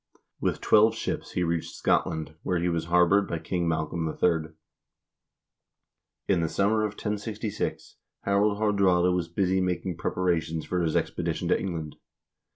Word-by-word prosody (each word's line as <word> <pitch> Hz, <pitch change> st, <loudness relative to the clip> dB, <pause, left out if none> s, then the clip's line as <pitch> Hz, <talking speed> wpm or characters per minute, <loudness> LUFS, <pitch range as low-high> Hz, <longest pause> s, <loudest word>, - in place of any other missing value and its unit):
With -, -, -1 dB
twelve 110 Hz, +1 st, +5 dB
ships -, -, -4 dB
he 90 Hz, -, 0 dB
reached 85 Hz, -1 st, -2 dB
Scotland, 80 Hz, -1 st, 0 dB
where 90 Hz, -2 st, 0 dB
he 90 Hz, +1 st, 0 dB
was 85 Hz, -1 st, -1 dB
harbored 90 Hz, +4 st, +4 dB
by 85 Hz, -, -2 dB
King 85 Hz, +2 st, -2 dB
Malcolm 80 Hz, +1 st, -1 dB
III. 80 Hz, -1 st, 0 dB, 1.7 s
In 95 Hz, -4 st, +2 dB
the 80 Hz, -, 0 dB
summer 110 Hz, +2 st, +2 dB
of 105 Hz, -1 st, -1 dB
1066 105 Hz, 0 st, -4 dB, 0.2 s
Harald 100 Hz, +1 st, +2 dB
Haardraade 95 Hz, -4 st, +3 dB
was 90 Hz, -2 st, -1 dB
busy 95 Hz, +2 st, +1 dB
making 90 Hz, -1 st, -2 dB
preparations 85 Hz, -3 st, -1 dB
for 90 Hz, -1 st, -1 dB
his 80 Hz, -2 st, 0 dB
expedition -, -, -1 dB
to -, -, +3 dB
England. 80 Hz, -5 st, -4 dB
90 Hz, 145 wpm, -27 LUFS, 85-100 Hz, 1.7 s, twelve